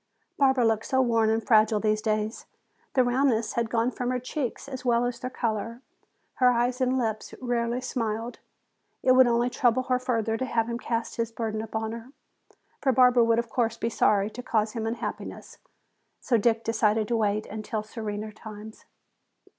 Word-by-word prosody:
Barbara 265 Hz, -3 st, +3 dB
looked 225 Hz, -1 st, +1 dB
so 260 Hz, -, +1 dB
worn 230 Hz, -3 st, +3 dB
and 220 Hz, 0 st, 0 dB
fragile 215 Hz, -1 st, +4 dB
these 215 Hz, 0 st, +1 dB
days. 215 Hz, 0 st, -2 dB, 0.5 s
The 255 Hz, -, +5 dB
roundness 245 Hz, -2 st, +1 dB
had 235 Hz, -1 st, -1 dB
gone 230 Hz, +2 st, +1 dB
from 250 Hz, 0 st, -3 dB
her 255 Hz, -, 0 dB
cheeks 255 Hz, +1 st, -4 dB
as 265 Hz, -2 st, -7 dB
well 240 Hz, -1 st, +2 dB
as 245 Hz, -1 st, -3 dB
their 255 Hz, 0 st, -4 dB
color, 230 Hz, 0 st, -3 dB, 0.5 s
her 250 Hz, -1 st, +5 dB
eyes 245 Hz, +1 st, +1 dB
and 255 Hz, 0 st, +2 dB
lips 220 Hz, -3 st, -3 dB
rarely 240 Hz, -1 st, -1 dB
smiled. 230 Hz, -1 st, -3 dB, 0.6 s
It 255 Hz, -, +5 dB
would 255 Hz, 0 st, +7 dB
only 240 Hz, 0 st, +2 dB
trouble 245 Hz, +1 st, +2 dB
her 255 Hz, -1 st, 0 dB
further 230 Hz, -3 st, -1 dB
to 260 Hz, -, -2 dB
have 230 Hz, -2 st, 0 dB
him 235 Hz, 0 st, -3 dB
cast 230 Hz, -2 st, -3 dB
his 230 Hz, -1 st, -1 dB
burden 220 Hz, -1 st, -3 dB
upon 220 Hz, 0 st, -3 dB
her. 230 Hz, +4 st, -9 dB, 0.7 s
For 270 Hz, -, +3 dB
Barbara 250 Hz, -1 st, +5 dB
would, 230 Hz, 0 st, +3 dB
of 235 Hz, 0 st, -1 dB
course, 230 Hz, -2 st, 0 dB
be 230 Hz, -, -1 dB
sorry 205 Hz, -1 st, +2 dB
to 250 Hz, -, -7 dB
cause 220 Hz, -3 st, 0 dB
him 225 Hz, -1 st, -3 dB
unhappiness. 225 Hz, +1 st, -6 dB, 0.6 s
So 250 Hz, -, 0 dB
Dick 230 Hz, +1 st, +2 dB
decided 220 Hz, -1 st, +1 dB
to 235 Hz, -, +1 dB
wait 215 Hz, 0 st, 0 dB
until 215 Hz, 0 st, -4 dB
serener 215 Hz, -1 st, -5 dB
times. 215 Hz, +1 st, -11 dB
230 Hz, 180 wpm, -27 LUFS, 220-250 Hz, 0.7 s, would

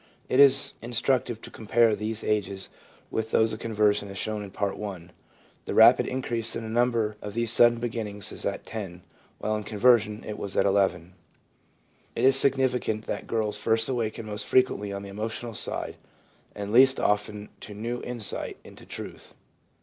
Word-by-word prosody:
It 130 Hz, -, +2 dB
is 140 Hz, 0 st, +6 dB
instructive 120 Hz, -1 st, 0 dB
to -, -, -9 dB
compare 115 Hz, 0 st, +2 dB
these 110 Hz, +1 st, -4 dB
ages 100 Hz, -2 st, -2 dB, 0.4 s
with 110 Hz, 0 st, -2 dB
those 110 Hz, 0 st, +2 dB
of 110 Hz, -, -6 dB
conversion 105 Hz, -2 st, +1 dB
as 100 Hz, -, -8 dB
shown 110 Hz, +1 st, -2 dB
in 100 Hz, -, -7 dB
Part 100 Hz, +1 st, -3 dB
I. 95 Hz, -5 st, -6 dB, 0.6 s
The -, -, -4 dB
rapid -, -, +7 dB
increase 120 Hz, -3 st, -1 dB
in 115 Hz, -, -4 dB
the 110 Hz, -, -6 dB
number 115 Hz, -3 st, +1 dB
of 105 Hz, 0 st, -7 dB
these 115 Hz, -1 st, 0 dB
sudden 120 Hz, 0 st, +5 dB
beginnings 110 Hz, -4 st, -4 dB
is -, -, -7 dB
at -, -, -3 dB
10, 95 Hz, -5 st, -7 dB, 0.3 s
while 110 Hz, -, -2 dB
in 105 Hz, -, -4 dB
conversion 105 Hz, 0 st, +2 dB
it 105 Hz, -, -6 dB
was 100 Hz, -, -4 dB
at -, -, +3 dB
11. 95 Hz, -3 st, +1 dB, 1.0 s
It -, -, +1 dB
is 135 Hz, 0 st, +6 dB
significant 130 Hz, -5 st, +2 dB
that -, -, -5 dB
girls 110 Hz, -2 st, -1 dB
first 110 Hz, 0 st, +2 dB
awaken 115 Hz, -3 st, -2 dB
most 105 Hz, 0 st, -5 dB
frequently 115 Hz, -6 st, +2 dB
on 100 Hz, 0 st, -5 dB
the 100 Hz, -, -8 dB
emotional 110 Hz, +3 st, -5 dB
side -, -, -4 dB, 0.6 s
and 100 Hz, +1 st, -5 dB
least 130 Hz, +2 st, +6 dB
often 105 Hz, 0 st, -1 dB
to 105 Hz, -, -10 dB
new 120 Hz, +3 st, -4 dB
insight 120 Hz, -4 st, -4 dB
into -, -, -15 dB
truth. -, -, -9 dB
110 Hz, 170 wpm, -26 LUFS, 105-120 Hz, 1.0 s, rapid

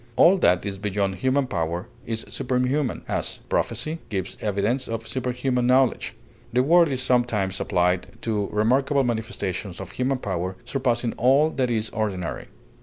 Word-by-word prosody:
All 190 Hz, +3 st, +6 dB
that 90 Hz, -, +3 dB
is 100 Hz, -1 st, -4 dB
beyond 100 Hz, -1 st, 0 dB
human 130 Hz, +2 st, +2 dB
power 85 Hz, -4 st, -2 dB, 0.2 s
is 115 Hz, -1 st, -2 dB
superhuman; 125 Hz, +2 st, -1 dB
as, -, -, -2 dB
prophecy 160 Hz, +2 st, -1 dB
gives 95 Hz, -3 st, -3 dB
evidence 105 Hz, +5 st, 0 dB
of 115 Hz, 0 st, -4 dB
superhuman 125 Hz, -1 st, -1 dB
knowledge; 130 Hz, 0 st, +2 dB, 0.4 s
the 125 Hz, +2 st, +3 dB
word 170 Hz, +4 st, +6 dB
is 130 Hz, -3 st, -2 dB
sometimes 115 Hz, -7 st, +1 dB
applied 90 Hz, -1 st, +1 dB, 0.2 s
to 105 Hz, -3 st, 0 dB
remarkable 135 Hz, +6 st, +2 dB
manifestations 110 Hz, -6 st, -3 dB
of 95 Hz, -, -7 dB
human 130 Hz, +1 st, 0 dB
power, 95 Hz, -5 st, -3 dB
surpassing 120 Hz, -2 st, 0 dB
all 135 Hz, +6 st, +4 dB
that 130 Hz, -4 st, 0 dB
is 110 Hz, -2 st, -1 dB
ordinary. 100 Hz, -5 st, -3 dB
120 Hz, 145 wpm, -24 LUFS, 100-130 Hz, 0.4 s, All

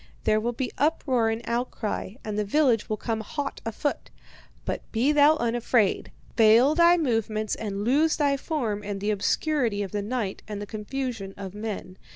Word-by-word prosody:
There 215 Hz, -, +3 dB
will 235 Hz, +2 st, -1 dB
be 250 Hz, +1 st, -3 dB
uproar 265 Hz, -6 st, +2 dB
and 225 Hz, +1 st, -3 dB
outcry, 235 Hz, -4 st, -3 dB
and 215 Hz, -1 st, -3 dB
the 210 Hz, -, 0 dB
village 240 Hz, 0 st, +2 dB
will 215 Hz, -, -1 dB
come 225 Hz, 0 st, -2 dB
hot 280 Hz, +6 st, -5 dB
afoot. 255 Hz, +6 st, -3 dB, 0.6 s
But -, -, -2 dB
be 240 Hz, +6 st, +2 dB
thou 295 Hz, +1 st, +6 dB
unafraid. 235 Hz, -4 st, +1 dB, 0.2 s
Veil 230 Hz, +5 st, +6 dB
thy 340 Hz, +2 st, +5 dB
movements 225 Hz, -, 0 dB
and 205 Hz, -2 st, -3 dB
lose 295 Hz, +7 st, +3 dB
thy 285 Hz, -3 st, +2 dB
form 255 Hz, -8 st, -2 dB
in 205 Hz, -1 st, -4 dB
the 205 Hz, +2 st, -1 dB
obscurity 225 Hz, +1 st, 0 dB
of 195 Hz, -, -6 dB
the 205 Hz, -, -2 dB
night 210 Hz, -2 st, -3 dB
and 210 Hz, -2 st, -5 dB
the 205 Hz, -, -5 dB
confusion 215 Hz, -1 st, -5 dB
of 195 Hz, -2 st, -7 dB
men. 210 Hz, -3 st, -6 dB
225 Hz, 175 wpm, -26 LUFS, 210-270 Hz, 0.6 s, thou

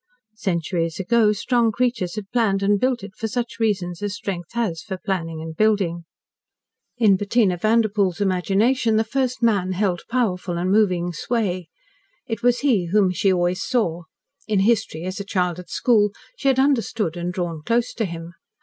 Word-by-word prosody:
Centuries 170 Hz, -3 st, -1 dB
ago 215 Hz, +3 st, +3 dB
strong 235 Hz, +2 st, +1 dB
creatures 235 Hz, -6 st, -1 dB
had 210 Hz, -2 st, -7 dB
planned 210 Hz, -5 st, +1 dB
and 205 Hz, 0 st, +3 dB
built 250 Hz, -3 st, 0 dB
it 195 Hz, -1 st, -9 dB
for 225 Hz, -, -3 dB
such 240 Hz, +1 st, -4 dB
reasons 190 Hz, -6 st, -1 dB
as 205 Hz, -1 st, -2 dB
strength 180 Hz, -4 st, -5 dB
has 220 Hz, -9 st, -1 dB
for 195 Hz, -, -5 dB
its 185 Hz, -, -15 dB
planning 165 Hz, -4 st, -2 dB
and 160 Hz, 0 st, -7 dB
building. 190 Hz, -5 st, +1 dB, 0.9 s
In 210 Hz, -5 st, +4 dB
Bettina 205 Hz, -1 st, +2 dB
Vanderpoel's 210 Hz, -2 st, +1 dB
imagination 205 Hz, +5 st, +2 dB
the 220 Hz, -, +3 dB
First 255 Hz, +1 st, -2 dB
Man 195 Hz, -5 st, +2 dB
held 185 Hz, -2 st, 0 dB
powerful 190 Hz, -8 st, -1 dB
and 180 Hz, +2 st, 0 dB
moving 180 Hz, -4 st, +2 dB
sway. 185 Hz, -2 st, -2 dB, 0.6 s
It 225 Hz, -2 st, -4 dB
was 245 Hz, 0 st, +2 dB
he 225 Hz, -11 st, +2 dB
whom 195 Hz, +1 st, +3 dB
she 190 Hz, +2 st, +2 dB
always 180 Hz, 0 st, +1 dB
saw. 175 Hz, -10 st, -1 dB, 0.4 s
In 210 Hz, -3 st, +2 dB
history, 205 Hz, -6 st, +1 dB
as 185 Hz, +2 st, -4 dB
a -, -, -3 dB
child 180 Hz, -3 st, -1 dB
at 180 Hz, -2 st, -11 dB
school, 210 Hz, -1 st, +3 dB, 0.3 s
she 280 Hz, -, -3 dB
had 265 Hz, -1 st, +4 dB
understood 230 Hz, -, +1 dB
and 175 Hz, 0 st, -3 dB
drawn 175 Hz, -4 st, -3 dB
close 235 Hz, +7 st, 0 dB
to 225 Hz, -, -1 dB
him. 170 Hz, -1 st, -7 dB
200 Hz, 175 wpm, -22 LUFS, 180-230 Hz, 0.9 s, In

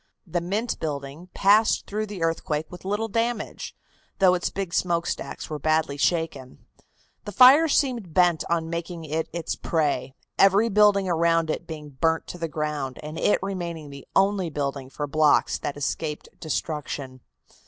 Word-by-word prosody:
The 175 Hz, -1 st, -2 dB
Mint 210 Hz, +7 st, -2 dB
building 145 Hz, +2 st, -5 dB
passed 210 Hz, +3 st, +4 dB
through 215 Hz, +1 st, -3 dB
the 195 Hz, -5 st, -5 dB
earthquake 160 Hz, -2 st, -1 dB
with 180 Hz, -, -10 dB
little 210 Hz, +3 st, -1 dB
damage, 230 Hz, 0 st, -2 dB, 0.4 s
though 190 Hz, -2 st, +5 dB
its 180 Hz, -, 0 dB
big 195 Hz, -3 st, -4 dB
smokestacks 170 Hz, -2 st, -1 dB
were 155 Hz, -2 st, -5 dB
badly 155 Hz, -1 st, +1 dB
shaken. 145 Hz, -4 st, -2 dB, 0.6 s
The 205 Hz, -, -5 dB
fire 260 Hz, -, +7 dB
seemed 250 Hz, -, 0 dB
bent 175 Hz, -1 st, +3 dB
on 165 Hz, -1 st, 0 dB
making 170 Hz, 0 st, -5 dB
it 160 Hz, +2 st, -2 dB
its 170 Hz, 0 st, -3 dB
prey, 150 Hz, -4 st, -1 dB, 0.2 s
every 200 Hz, +4 st, +5 dB
building 205 Hz, -2 st, +4 dB
around 165 Hz, -1 st, +2 dB
it -, -, -5 dB
being 150 Hz, -2 st, -7 dB
burned 160 Hz, +4 st, 0 dB
to 175 Hz, -, -7 dB
the 165 Hz, -, -2 dB
ground, 150 Hz, -4 st, -3 dB
and 155 Hz, +2 st, -6 dB
it -, -, +3 dB
remaining 170 Hz, -6 st, -5 dB
the 140 Hz, -1 st, -11 dB
only 195 Hz, -2 st, +2 dB
building 140 Hz, -3 st, -3 dB
for 145 Hz, +2 st, -4 dB
blocks 150 Hz, +1 st, +3 dB
that 145 Hz, -, -4 dB
escaped 150 Hz, +2 st, -3 dB
destruction. 145 Hz, -4 st, -4 dB
165 Hz, 155 wpm, -25 LUFS, 150-195 Hz, 0.6 s, fire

